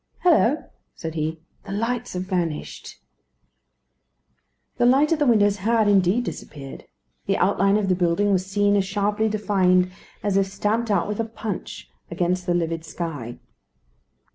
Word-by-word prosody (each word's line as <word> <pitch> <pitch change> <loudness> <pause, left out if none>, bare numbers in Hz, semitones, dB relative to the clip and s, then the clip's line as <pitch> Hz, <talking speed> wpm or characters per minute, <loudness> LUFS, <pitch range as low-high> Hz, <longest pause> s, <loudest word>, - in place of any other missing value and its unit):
"Hillo!" 310 -5 +3 0.2
said 160 -1 -6
he, 160 0 -3 0.2
"the - - -7
lights 230 +4 -2
have 180 0 -2
vanished." 175 -5 -4 1.8
The 240 - +4
light 275 +5 +4
at 325 - +2
the 295 - +2
windows 205 -3 +4
had, 220 +2 +2
indeed, 200 +3 +3
disappeared. 140 - -8 0.4
The - - +1
outline 195 +2 +3
of 210 -2 0
the 185 - +3
building 180 +3 +1
was 185 -2 +2
seen 205 +1 +1
as 200 - +3
sharply 205 +3 0
defined 185 -4 +2 0.3
as 200 -2 +1
if 195 -1 +2
stamped 210 +4 -1
out 200 -5 +1
with 210 +1 -4
a - - +2
punch 220 -3 -6 0.2
against 175 +1 -1
the 175 - +2
livid 165 -1 -1
sky. 155 -8 -6
195 Hz, 150 wpm, -23 LUFS, 175-215 Hz, 1.8 s, The